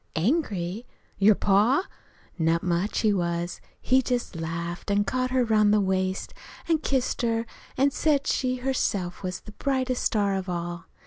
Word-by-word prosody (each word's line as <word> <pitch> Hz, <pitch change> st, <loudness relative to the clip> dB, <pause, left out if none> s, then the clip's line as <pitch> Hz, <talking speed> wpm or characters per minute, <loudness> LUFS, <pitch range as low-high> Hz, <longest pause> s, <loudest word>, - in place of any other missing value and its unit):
"Angry? 205 Hz, -, -1 dB, 0.3 s
Your 205 Hz, +1 st, +6 dB
pa? 210 Hz, -, +3 dB, 0.5 s
Not 165 Hz, +1 st, +2 dB
much 180 Hz, +3 st, 0 dB
he 215 Hz, -2 st, +3 dB
was! 175 Hz, -1 st, -2 dB, 0.2 s
He 260 Hz, +1 st, +3 dB
just 245 Hz, -6 st, -2 dB
laughed 170 Hz, +3 st, -4 dB
an' 200 Hz, 0 st, +3 dB
caught 255 Hz, +4 st, -1 dB
her 255 Hz, 0 st, +2 dB
'round 215 Hz, -2 st, +4 dB
the 210 Hz, -, +4 dB
waist 190 Hz, -1 st, -1 dB, 0.3 s
an' 325 Hz, -2 st, +3 dB
kissed 265 Hz, -4 st, -1 dB
her, 230 Hz, -1 st, 0 dB, 0.3 s
an' 275 Hz, +2 st, +3 dB
said 285 Hz, -1 st, +1 dB
she 255 Hz, -1 st, 0 dB
herself 245 Hz, -8 st, -1 dB
was 185 Hz, -1 st, -4 dB
the 210 Hz, -, -12 dB
brightest 260 Hz, +2 st, -1 dB
star 205 Hz, -2 st, +1 dB
of 190 Hz, -1 st, -3 dB
all. 175 Hz, -1 st, -4 dB
205 Hz, 155 wpm, -26 LUFS, 180-255 Hz, 0.5 s, Your